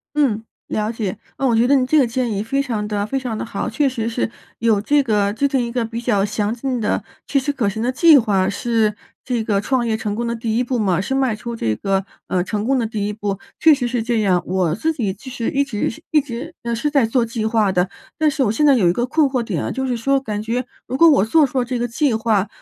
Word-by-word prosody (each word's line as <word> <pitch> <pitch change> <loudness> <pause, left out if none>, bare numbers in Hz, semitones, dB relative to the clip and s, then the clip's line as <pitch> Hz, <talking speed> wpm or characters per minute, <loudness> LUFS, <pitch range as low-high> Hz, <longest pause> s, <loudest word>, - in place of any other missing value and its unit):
嗯， 255 -8 +2 0.3
了 215 0 -1
解。 220 -3 -3 0.2
那 270 - +1
我 240 - +3
觉 230 +2 +4
得 280 - +4
你 265 -2 +3
这 310 +4 +3
个 270 - +4
建 240 +1 -1
议 200 0 -1
非 275 +6 0
常 225 -6 -3
得 205 -1 -1
非 270 +5 -1
常 250 -4 -4
得 - - -3
好。 200 -3 -4
确 275 +5 +1
实 230 -4 -3
是 230 0 -2 0.3
有 225 -3 +2
这 290 +7 +3
个 210 -5 +1
制 225 +7 +1
定 265 -3 +1
一 235 - -4
个 245 -1 0
比 230 +1 -5
较 210 -5 +1
详 210 0 -1
尽 250 0 -2
的、 215 - -1 0.2
切 280 - +1
实 275 +2 -1
可 245 -8 0
行 220 +2 -3
的 250 +2 0
计 320 +3 +7
划 200 -6 +1
是 220 0 0 0.3
这 240 -3 -1
个 205 -3 +1
创 245 +3 0
业 225 - 0
成 210 -2 -3
功 235 +2 -2
的 235 - -1
第 225 -1 -2
1 245 - +2
步 250 0 -1
嘛， 190 -6 +1
是 265 +8 -2
迈 265 -5 +1
出 235 +2 -6
这 110 - -1
个， 195 - 0 0.2
呃， 180 - +1
成 205 +3 -3
功 265 +3 +2
的 235 - 0
第 215 -2 -3
1 210 - -2
步， 205 -2 -3 0.2
确 315 -1 +7
实 250 -3 -2
是 240 -1 -1
这 230 0 0
样。 185 -3 +2
我 180 -3 0
自 315 - 0
己 230 -11 -2
其 225 +8 -12
实 235 -2 -2
一 280 - +2
直 265 +1 -3
一 315 - +4
直 280 +5 -7 0.2
是 265 +6 -1
在 280 -4 +3
做 230 +1 +1
计 230 -1 -3
划 220 -2 +2
的， 180 0 +1 0.3
但 310 -1 +3
是 295 -1 -1
我 210 - +1
现 265 +7 +1
在 285 -2 +6
有 205 -9 +3
一 - - +4
个 240 +6 -1
困 290 +3 +2
惑 260 -2 -1
点 230 - -3
啊 - - -2
就 265 0 -2
是 250 -2 -1
说， 275 +4 +2
感 215 -6 -4
觉 235 +3 -2 0.2
如 255 - -3
果 335 +4 +7
我 280 - +4
做 300 +7 +4
出 260 -1 -1
这 245 0 -3
个 240 - 0
计 245 +2 0
划， 220 -3 +1
230 Hz, 290 characters per minute, -20 LUFS, 210-265 Hz, 0.3 s, 计